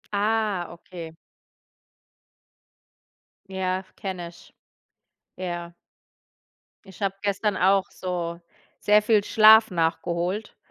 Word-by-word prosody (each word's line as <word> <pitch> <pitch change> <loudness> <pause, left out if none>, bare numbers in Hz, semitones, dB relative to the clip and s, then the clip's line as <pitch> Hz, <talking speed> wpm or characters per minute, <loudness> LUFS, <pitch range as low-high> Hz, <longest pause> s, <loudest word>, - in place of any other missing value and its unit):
Ah, 210 -3 0
okay. 170 -1 -10 2.3
Ja, 190 0 -2
kenne 185 -3 -5
ich. 170 - -18 0.8
Ja. 175 -2 -5 1.1
Ich 190 +1 -15
habe 195 -1 -1
gestern 205 0 0
auch 190 +1 +2
so 175 -2 -4 0.4
sehr 210 0 +4
viel 210 -1 +3
Schlaf 220 +1 +6
nachgeholt 175 +4 -2
190 Hz, 85 wpm, -25 LUFS, 175-210 Hz, 2.3 s, Schlaf